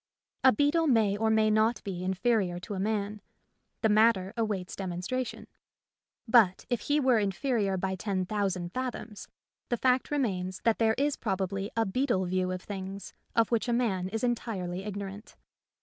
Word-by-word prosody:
A 260 - +8
beetle 290 +7 +2
may 220 -6 +3
or 220 +1 +1
may 220 -1 +3
not 220 +2 +2
be 180 -3 -4
inferior 190 -1 +1
to 205 - -6
a 190 - -3
man 210 0 -2 0.3
— - - -49
the 220 - +4
matter 215 -2 +3
awaits 210 -6 -2
demonstration; 190 +7 -4 0.8
but 220 -6 +4
if 245 - +1
he 290 +1 +1
were 255 -5 +4
in 200 -2 +1
ferior 205 -4 0
by 190 +1 -1
ten 190 -1 -2
thousand 185 -3 -2
fathoms, 245 -4 -5 0.4
the 240 - +1
fact 255 +1 +2
remains 190 -10 -1
that 230 -1 +2
there 220 -1 +3
is 285 +1 +1
probably 195 -1 -2
a 225 - +3
beetle 220 -2 0
view 185 0 0
of 185 0 -4
things 195 0 -6 0.2
of 230 0 +3
which 230 +1 +1
a - - +2
man 195 -7 0
is 225 +3 -3
entirely 195 -7 -2
igno 200 -1 -4
rant. 200 +3 -10
210 Hz, 175 wpm, -29 LUFS, 190-235 Hz, 0.8 s, A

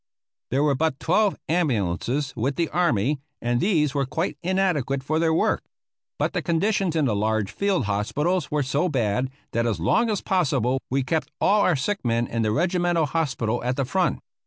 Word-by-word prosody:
There 135 +3 +1
were 150 -2 +3
but 145 0 0
twelve 205 +4 +2
ambulances 135 - 0
with 130 +4 -1
the 170 -2 0
army, 145 - +1 0.2
and 120 0 0
these 155 -8 +2
were 140 -2 0
quite 160 +6 -2
inadequate 175 -8 0
for 155 +3 0
their 165 -1 +2
work; 160 - +1 0.6
but - - -1
the - - -1
conditions 180 0 0
in 155 -3 +2
the 115 -5 +1
large 110 0 0
field 195 - 0
hospitals 150 - 0
were 150 -1 0
so 145 +7 0
bad, 125 -2 0 0.2
that 115 +1 0
as 105 -7 -1
long 165 - +2
as 210 -3 -1
possible 135 - +1
we 135 +1 +1
kept 160 +4 -1
all 210 +1 +3
of - - +3
our 180 - +3
sick 195 +10 -2
men 115 -1 +1
in 115 -1 -2
the 110 - +1
regimental 175 - +1
hospital 130 -6 -1
at 125 +1 0
the 135 - -1
front. 185 +7 +1
145 Hz, 190 wpm, -24 LUFS, 120-175 Hz, 0.6 s, were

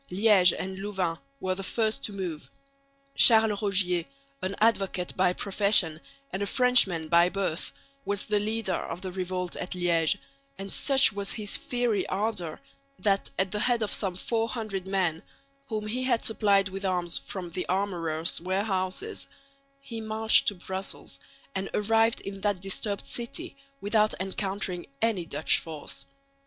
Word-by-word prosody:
Liège 190 -1 +5
and 190 0 -5
Louvain 190 -4 -2 0.2
were 185 0 -1
the 190 - -5
first 220 +2 -1
to - - -2
move. 180 -6 -5 0.6
Charles 220 -5 +6
Rogier, 185 -4 +2 0.4
an 190 +1 -2
advocate 195 -5 +1
by 185 -1 +3
profession 190 -4 +3 0.3
and 190 - -3
a 200 - -1
Frenchman 200 -10 +3
by 170 +2 +5
birth, 190 -4 -2 0.3
was 200 -3 -2
the 210 -1 +1
leader 215 -2 -1
of 170 0 -4
the 185 - -4
revolt 180 -1 -3
at 180 - -4
Liège; 170 -3 +2 0.4
and 195 0 -7
such 270 -5 +4
was 200 0 -4
his 210 -2 -3
fiery 240 -6 0
ardour 190 -5 -2 0.4
that 200 -2 +1
at 190 -1 0
the 210 - -1
head 240 0 +2
of 210 - -2
some 190 -4 0
400 220 -2 -2
men, 180 -4 0 0.5
whom 215 -3 -3
he 235 +4 -2
had 240 -3 +1
supplied 200 -3 +3
with 195 +1 -6
arms 180 -3 0
from 180 -3 -6
the 180 +2 -4
armourer's 170 -5 +1
warehouses, 190 - -2 0.5
he 230 -4 -7
marched 220 0 +4
to 205 - +2
Brussels, 190 +2 -4 0.3
and 190 -2 -3
arrived 225 +2 +2
in 195 0 -7
that 205 -2 0
disturbed 195 +2 -3
city 325 +9 -4 0.2
without 215 0 +2
encountering 190 -1 -3
any 200 -7 0
Dutch 150 0 +2
force. 155 -3 -7
195 Hz, 150 wpm, -27 LUFS, 180-215 Hz, 0.6 s, Charles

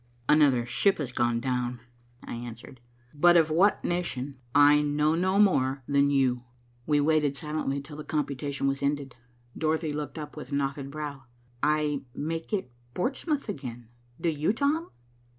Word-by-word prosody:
"Another 140 -6 +4
ship 190 +11 +2
has 140 -5 -4
gone 120 -1 +1
down," 125 0 -2 0.4
I - - -7
answered; 120 +1 -8 0.3
"but 175 +4 +5
of 160 -2 +3
what 190 +6 +3
nation 140 -6 -2 0.2
I 145 +1 +7
know 150 +1 +1
no 185 +3 +1
more 135 -10 +3
than 140 0 +3
you." 130 -3 +2 0.4
We 150 -1 +3
waited 150 -1 +2
silently 150 -2 -2
till 145 +1 -11
the 155 - -6
computation 140 -2 -2
was 135 0 0
ended. 140 -2 -1 0.4
Dorothy 160 -1 0
looked 145 -1 -5
up 150 -1 -7
with 150 - -8
knotted 140 0 -2
brow. 145 -2 -6 0.4
"I 150 -2 +1
make 165 +5 -4
it 190 - -2 0.2
Portsmouth 280 - -1
again. 120 - -6 0.3
Do 170 - +1
you, 155 +6 0
Tom?" 295 +7 0
145 Hz, 150 wpm, -28 LUFS, 135-160 Hz, 0.4 s, I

